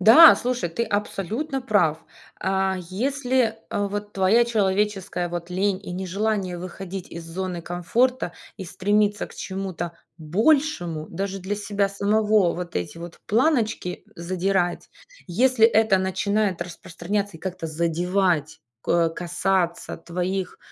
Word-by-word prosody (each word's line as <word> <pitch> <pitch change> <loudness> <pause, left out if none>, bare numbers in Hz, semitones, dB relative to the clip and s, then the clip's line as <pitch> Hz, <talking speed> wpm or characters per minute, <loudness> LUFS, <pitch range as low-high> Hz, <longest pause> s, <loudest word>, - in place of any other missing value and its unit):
Да, 265 - +10
слушай, 245 -7 -1
ты 230 +8 -1
абсолютно 220 - -2
прав. 195 -11 +2 0.4
А, 190 0 +1
если, 250 +1 0
а, 205 0 0
вот 205 +1 -5
твоя 195 +5 +4
человеческая 200 -4 0
вот 175 0 -5
лень 190 +1 0
и - - -7
нежелание 190 0 -1
выходить 185 +1 -7
из 170 0 -7
зоны 175 +1 -4
комфорта 185 +6 0 0.2
и 190 - -6
стремиться 205 +3 +1
к - - -15
чему-то 190 -3 -4 0.3
большему 175 - +1
даже 195 +2 -4
для 200 +3 -3
себя 205 -1 0
самого, 205 -1 +2
вот 175 -1 -5
эти 90 - -4
вот 170 0 -9
планочки 225 - +1
задирать, 180 +1 -1 0.4
если 225 +5 +4
это 220 -4 +4
начинает 190 0 0
распространяться 185 +2 -4
и - - -18
как-то 185 -3 -4
задевать, 165 0 0 0.2
ко 170 -1 +2
касаться 175 +1 -1
твоих 180 +3 -3
190 Hz, 125 wpm, -24 LUFS, 175-210 Hz, 0.4 s, Да